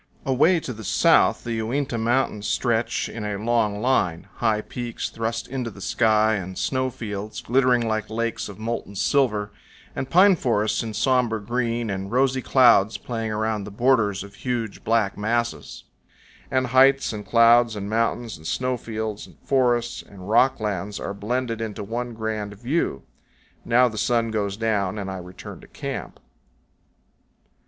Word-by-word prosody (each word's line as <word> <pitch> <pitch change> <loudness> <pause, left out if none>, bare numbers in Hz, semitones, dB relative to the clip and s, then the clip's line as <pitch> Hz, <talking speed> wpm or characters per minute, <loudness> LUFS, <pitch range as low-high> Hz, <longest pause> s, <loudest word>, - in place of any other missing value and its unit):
Away 150 +7 +3
to 125 - -5
the 110 0 -10
south - - +3
the 115 -1 -3
Uinta 130 +3 -2
Mountains 115 -2 0
stretch 115 -2 0
in 115 - -7
a 105 -1 -3
long 105 -1 0
line, 95 -10 +1
high 110 -2 +1
peaks 120 +1 -5
thrust 115 0 -3
into 125 -2 -3
the 100 - -13
sky, 110 +1 +2
and 95 -1 -6
snow 130 -1 0
fields 110 -4 -6
glittering 125 -1 +2
like 110 -1 -2
lakes 115 0 -2
of 100 - -10
molten 110 -2 -4
silver, 105 -3 +1 0.4
and 135 - -4
pine 190 +2 +6
forests 110 -7 0
in 110 -2 -5
somber 120 -1 +2
green, 115 0 -2
and 95 +1 -4
rosy 130 +1 +2
clouds 120 -6 +4
playing 115 -2 -4
around 110 -1 -1
the 100 - -7
borders 105 -3 +2
of 100 0 -12
huge, 115 -2 -4
black 110 -3 +1
masses; 115 +3 -2 0.7
and 130 0 +1
heights 135 -1 +5
and 105 -2 -7
clouds 115 +1 +5
and 100 -1 -5
mountains 115 -1 -1
and 80 0 -9
snow 130 0 -1
fields 110 -2 -5
and - - -19
forests 120 -3 +1
and 95 -2 -13
rock 125 +4 +4
lands 105 -2 -3
are 100 - -4
blended 115 +3 -2
into 110 -2 -4
one 120 +3 -4
grand 110 -2 -4
view. 120 - -2 0.6
Now 125 +2 +4
the 110 -3 -5
sun 115 +1 +1
goes 100 -2 -2
down, 105 -3 0
and 95 -2 -4
I 95 - -5
return 90 +1 -10
to - - -15
camp. - - -6
115 Hz, 160 wpm, -24 LUFS, 105-120 Hz, 0.7 s, pine